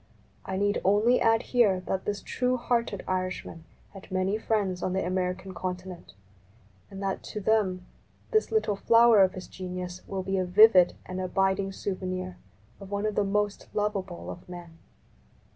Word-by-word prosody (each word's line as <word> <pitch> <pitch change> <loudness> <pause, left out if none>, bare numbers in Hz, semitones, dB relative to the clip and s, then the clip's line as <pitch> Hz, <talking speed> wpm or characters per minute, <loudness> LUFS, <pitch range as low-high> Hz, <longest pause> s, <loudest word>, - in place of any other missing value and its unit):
I 190 - -2
need 205 +1 +1
only 210 +6 +3
add 225 0 +3
here 210 -7 +4
that 190 +1 -3
this 205 -1 -3
true 255 0 0
hearted 235 -5 -1
Irishman 185 -3 -3 0.3
had 195 -2 -12
many 185 +2 0
friends 200 -5 -1
on 185 - -1
the 190 - 0
i# - - -3
American 185 +1 -2
continent, 180 - -6 0.8
and 195 0 -8
that 195 -1 -2
to 210 - -5
them 190 -4 +1 0.5
this 435 0 +2
little 435 - +1
flower 230 +1 +5
of 190 -1 +4
his 185 - -8
genius 180 -1 -6
will 190 -1 -3
be 195 +1 -1
a - - +1
vivid 185 -1 +6
and 185 0 -5
abiding 195 +1 0
souvenir 185 -2 -4 0.4
of 195 -1 -10
one 200 +1 -2
of 215 - 0
the 205 - +1
most 205 +1 -1
lovable 195 -4 -2
of 180 - -12
men. 170 -2 -10
190 Hz, 165 wpm, -27 LUFS, 185-210 Hz, 0.8 s, vivid